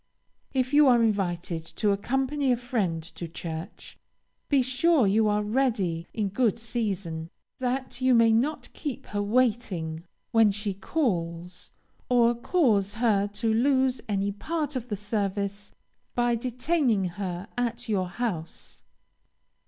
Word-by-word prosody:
If 260 0 0
you 295 0 +7
are 240 -2 +5
invited 175 -6 -1
to 205 +5 -1
accompany 270 +6 0
a 245 - +2
friend 210 -10 -1
to 170 +1 -7
church, 165 0 -7 0.5
be 275 -3 +4
sure 260 +2 +3
you 215 +3 +3
are 210 0 +1
ready 210 -8 0
in 210 -3 -1
good 225 +1 +1
season, 195 -8 -3 0.3
that 255 0 -2
you 255 -1 +4
may 230 -1 +5
not 265 +8 0
keep 285 -6 -5
her 205 0 -3
waiting 205 -8 0 0.3
when 225 -2 +5
she 205 0 -2
calls, 180 - -3 0.4
or 240 -1 +4
cause 230 - +1
her 215 -3 +2
to 205 +2 -1
lose 260 +2 +2
any 200 0 0
part 300 +7 -3
of 250 -2 -3
the 210 - -1
service 200 -1 -2 0.4
by 240 0 +2
detaining 250 - +1
her 180 +1 -4
at 245 0 -2
your 195 -4 0
house. 180 -6 -5
220 Hz, 135 wpm, -27 LUFS, 195-250 Hz, 0.5 s, you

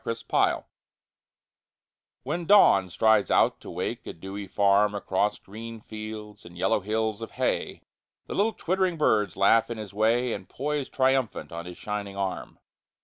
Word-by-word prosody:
Alarm 115 - -2
Clocks - - +1 1.6
When 175 0 -3
Dawn 100 - +6
strides 110 +3 +3
out - - +3
to - - -10
wake - - -4
a - - -5
dewy 95 +4 -7
farm 100 +2 +3
Across 100 +1 0
green 115 +3 -9
fields 110 -1 -8
and 85 0 -13
yellow 95 +3 +2
hills 110 +2 -2
of 115 - -5
hay - - -2 0.4
The - - -6
little 215 +3 +1
twittering 185 -2 0
birds 105 - +2
laugh 110 +4 +4
in 120 - -4
his 105 -2 -8
way 115 +3 +2
And 95 -2 -7
poise 145 0 -3
triumphant 130 -6 0
on 85 +1 -6
his 90 - -9
shining 100 -2 -5
arm. 95 -1 -4
110 Hz, 155 wpm, -26 LUFS, 100-120 Hz, 1.6 s, Dawn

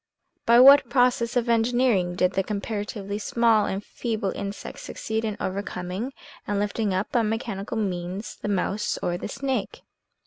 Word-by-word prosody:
By 235 +1 +7
what 275 -1 +8
process 245 -1 +2
of 245 -1 +1
engineering 230 -6 +2
did 185 +1 +2
the 195 - +2
comparatively 205 0 -4
small 225 0 +3
and 195 +2 -3
feeble 220 -5 -2
insect 200 0 -6
succeed 220 0 -4
in 215 -2 -2
overcoming 190 +4 -4 0.3
and 205 - 0
lifting 205 +1 0
up 190 +2 -1
by 240 - +3
mechanical 220 -1 -3
means, 185 -1 -3
the - - -6
mouse 200 +1 -1
or 175 - 0
the - - -4
snake 260 -2 -3
210 Hz, 150 wpm, -25 LUFS, 195-235 Hz, 0.3 s, what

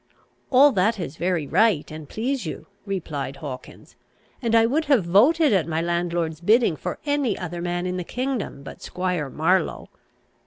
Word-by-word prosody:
"All 280 +2 +6
that 210 +1 +1
is 160 -6 -5
very 175 -2 0
right, 185 -1 +2
and 155 -2 -9
please 255 +3 -2
you," 160 - -6 0.2
replied 155 -8 -4
Hawkins, 135 -2 -9 0.5
"and 230 -2 +1
I 225 0 +6
would 300 +7 +1
have 270 - +3
voted 265 - +4
at 180 -5 +2
my 160 -1 -1
landlord's 170 -1 -1
bidding 215 -1 +3
for - - -5
any 285 -7 0
other 175 -1 -5
man 175 0 -2
in 180 0 -2
the 180 - -3
kingdom 250 - -4
but - - -10
Squire 180 -6 -2
Marlow. 165 +4 0
180 Hz, 165 wpm, -24 LUFS, 165-230 Hz, 0.5 s, All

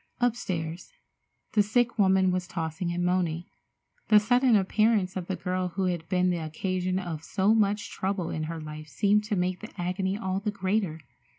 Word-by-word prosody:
Upstairs, 180 -9 -2 0.6
the 215 - +4
sick 230 +3 +1
woman 190 -1 +4
was 180 -1 -2
tossing 165 +1 -3
and 175 0 -1
moaning. 175 -2 0 0.6
The 210 -1 +7
sudden 245 +3 +4
appearance 205 -1 +2
of 180 -2 -4
the 190 - -1
girl 185 0 -2
who 195 - 0
had 175 -3 -2
been 180 -1 +2
the 175 - 0
occasion 185 +3 -2
of 170 -4 -4
so 200 +4 +2
much 210 -1 +1
trouble 190 -3 -2
in 155 0 -2
her 165 +1 -5
life 155 0 -8
seemed 205 +9 +2
to 210 0 -1
make 180 0 0
the 215 - -8
agony 190 +2 -1
all 190 -3 -2
the 210 +1 -2
greater. 190 -4 -1
185 Hz, 180 wpm, -28 LUFS, 175-205 Hz, 0.6 s, The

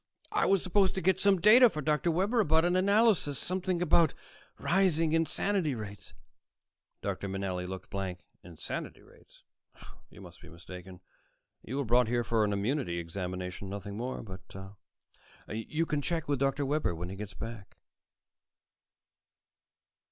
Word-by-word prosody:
"I - - +2
was 195 -2 +3
supposed 190 0 +2
to 190 - -1
get 185 +1 +2
some 200 -2 +4
data 230 +7 +8
from 155 -7 -6
Dr. 150 +2 +1
Webber 195 +8 +1
about 160 -4 +3
an 175 +1 +2
analysis, 200 - +3
something 185 -1 -1
about 165 -2 +4 0.4
rising 165 -4 +2
insanity 165 0 +1
rates." 105 -2 -9 0.9
Dr. 100 - -3
Manelli 95 -2 -3
looked 95 0 -8
blank. 95 -2 -4 0.2
"Insanity 85 -4 -7
rates? - - -21 0.7
You - - -15
must 90 -2 -13
be 90 - -13
mistaken. 90 +1 -11 0.6
You 130 - -5
were 140 - -1
brought 120 +1 +4
here 120 +1 +1
for 115 -1 +1
an 105 - +1
immunity 100 -1 -1
examination, 90 +2 -5
nothing 100 0 -6
more. 125 +4 -4
But 95 -1 -10 0.8
you 130 +9 -2
can 150 -2 -1
check 165 +1 -2
with 145 -2 0
Dr. 140 +1 +1
Webber, 140 - 0
when 85 +2 -5
he 95 - -6
gets 100 -1 -8
back." 115 -1 -8
130 Hz, 145 wpm, -30 LUFS, -, 0.9 s, data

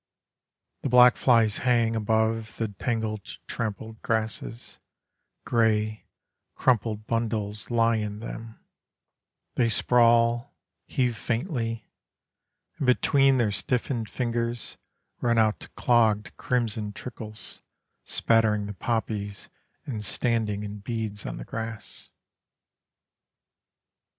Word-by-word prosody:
The 140 - -2
black 125 0 +7
flies 115 -4 +3
hang 115 -2 +2
Above 110 0 0
the 115 -2 -1
tangled 110 0 -2 0.2
trampled 110 0 -4
grasses, 110 +1 -2 0.7
Grey, 110 -2 +1 0.5
crumpled 110 -3 +1
bundles 110 -2 -1
lie 115 -1 +3
in 105 -1 -3
them: 115 0 -8 0.9
They 120 -2 +2
sprawl, 120 +2 +3 0.3
Heave 125 -4 0
faintly; 115 - -2 0.9
And 135 - -1
between 135 +1 +4
their 115 -4 +2
stiffened 120 +2 -1
fingers, 120 -1 -2 0.4
Run 120 -1 +2
out 110 -1 +2
clogged 110 -4 +2
crimson 110 -4 -1
trickles, 110 -2 -7 0.4
Spattering 110 -2 +2
the 105 - -5
poppies 105 -3 -3 0.4
and 110 -6 -4
standing 105 -1 +1
in 105 0 -6
beads 105 -1 -4
on - - -5
the - - -7
grass. 110 -1 -5
115 Hz, 95 wpm, -26 LUFS, 105-120 Hz, 0.9 s, black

